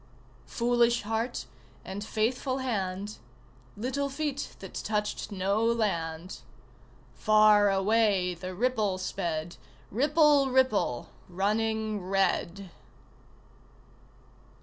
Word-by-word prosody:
Foolish 240 -1 +2
heart 225 +3 -2 0.4
and 195 +2 -5
faithful 250 +5 -1
hand, 205 -5 -3 0.6
Little 265 +5 -2
feet 285 0 -4
that 190 - -10
touched 210 -1 -2
no 200 +3 0
land. 185 -7 -1 0.7
Far 215 -1 +5
away 195 -2 +2
the 185 +2 -7
ripple 215 -3 0
sped, 170 -2 -3 0.3
Ripple 290 - +4
ripple 255 - +1 0.2
running 215 +3 -1
red! 190 0 -1
215 Hz, 80 wpm, -28 LUFS, 190-240 Hz, 0.7 s, Far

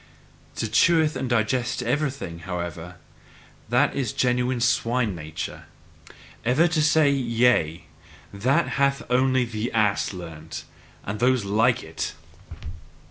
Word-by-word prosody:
To 115 - -2
chew 160 +8 +4
and 130 - -3
digest 120 +1 0
everything, 140 - -2
however 85 0 -6 0.7
that - - +3
is 130 -6 -2
the - - -16
genuine 125 0 +1
swine 115 -2 +1
nature! 80 0 -7 0.8
Ever 130 +9 +3
to 160 -1 +1
say 150 -1 +4
YE 120 -3 +1
A 85 -9 +2 0.5
that 130 +11 +1
hath 140 0 +2
only 130 0 +3
the 115 0 -4
ass 105 -3 +1
learnt, 80 -4 -8 0.4
and 100 +2 -5
those 125 -2 +2
like 115 +5 +2
it! 80 0 -5
120 Hz, 125 wpm, -24 LUFS, 95-130 Hz, 0.8 s, chew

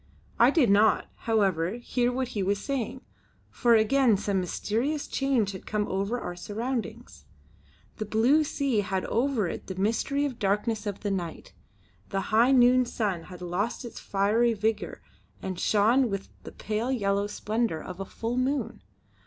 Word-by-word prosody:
I 235 - +7
did 275 - +3
not, 210 +1 +4
however, 195 -6 +1
hear 245 +1 -1
what 255 0 -2
he 210 -5 -3
was 200 +2 +1
saying, 260 +1 -3 0.5
for 235 -1 +3
again 225 0 +4
some 200 -1 0
mysterious 235 - -2
change 260 -7 0
had 190 - -10
come 210 -1 -1
over 200 +6 -1
our 175 - -5
surroundings. 230 +6 -5 0.7
The 215 - -3
blue 245 +9 +4
sea 280 -6 0
had 190 -1 -1
over 240 -4 0
it - - -6
the 190 - -5
mystery 230 +9 0
of 285 - -1
the 245 - -15
darkness 210 +2 0
of 200 -1 -4
the 205 - -2
night; 175 -4 -5 0.6
the 195 - -1
high 235 +4 +5
noon 255 -1 +6
sun 200 -8 -2
had 180 -1 -10
lost 200 +8 -2
its 235 - -8
fiery 220 +4 +1
vigour 220 +1 -2 0.4
and 185 -2 -5
shone 230 +5 +3
with 195 -1 -4
the - - -9
pale 220 +4 -2
yellow 200 -4 0
splendour 215 -3 -1
of 180 +3 -8
a 195 - -3
full 230 +5 -4
moon. 270 +3 -1
220 Hz, 165 wpm, -27 LUFS, 200-245 Hz, 0.7 s, I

